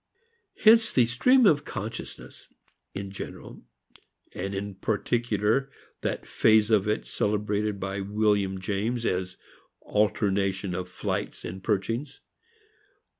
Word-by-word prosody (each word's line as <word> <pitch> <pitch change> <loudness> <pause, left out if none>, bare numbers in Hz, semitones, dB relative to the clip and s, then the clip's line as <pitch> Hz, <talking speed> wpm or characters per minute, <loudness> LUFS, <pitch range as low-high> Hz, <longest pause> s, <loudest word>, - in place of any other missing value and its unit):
Hence 225 +1 +6
the 125 - +4
"stream 240 - +4
of 150 -7 +4
consciousness" 115 -1 -7 0.5
in 100 0 -5
general, 100 - -8 0.7
and 100 +2 -4
in 100 +1 -4
particular 110 +4 0 0.3
that - - -3
phase 110 0 +3
of 105 -1 +3
it 105 - 0
celebrated 105 0 -1
by 95 +1 -3
William 100 -1 +1
James 105 +5 -2
as 90 0 -2 0.4
alternation 100 -2 0
of 90 0 -4
flights 90 - -4
and 95 +2 -7
perchings. 115 +7 -2
105 Hz, 110 wpm, -27 LUFS, 95-115 Hz, 0.7 s, Hence